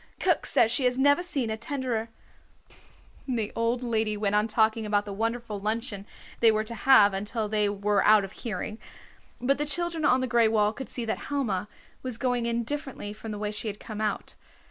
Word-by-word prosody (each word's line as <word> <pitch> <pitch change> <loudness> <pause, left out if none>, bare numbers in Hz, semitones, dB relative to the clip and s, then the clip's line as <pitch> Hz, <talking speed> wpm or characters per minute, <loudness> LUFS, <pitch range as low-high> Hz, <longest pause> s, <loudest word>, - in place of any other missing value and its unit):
Cook - - +1
says 225 - +4
she 255 +2 +1
has 250 0 +2
never 285 +5 +4
seen 280 -11 -2
a 220 - -2
tenderer 235 -2 -3 0.6
" - - -25
The 215 -2 -2
old 230 +2 0
lady 220 -3 0
went 205 -1 0
on 210 +1 +3
talking 220 0 +2
about 205 -1 0
the 200 - -6
wonderful 225 0 -3
luncheon 210 -1 -3 0.3
they 230 -1 +6
were 215 0 0
to 225 +2 -7
have 225 -3 +5
until 210 +3 -3
they 210 -1 +1
were 205 0 +1
out 215 -1 +6
of 195 - -6
hearing. 215 0 -5 0.6
But 275 +3 +1
the - - +1
children 335 +1 +1
on 255 -3 +4
the 260 - 0
gray 235 -2 +3
wall 215 -1 +2
could 265 - -7
see 240 - -4
that 220 - -2
Helma 215 -9 -1 0.3
was 255 -3 -5
going 245 -2 0
in 235 0 0
differently 270 -5 -5
from 220 +1 -9
the 210 - -4
way 210 0 -3
she 210 +1 -4
had 210 -1 -5
come 215 -1 -7
out. 215 -1 -2
225 Hz, 210 wpm, -27 LUFS, 210-250 Hz, 0.6 s, they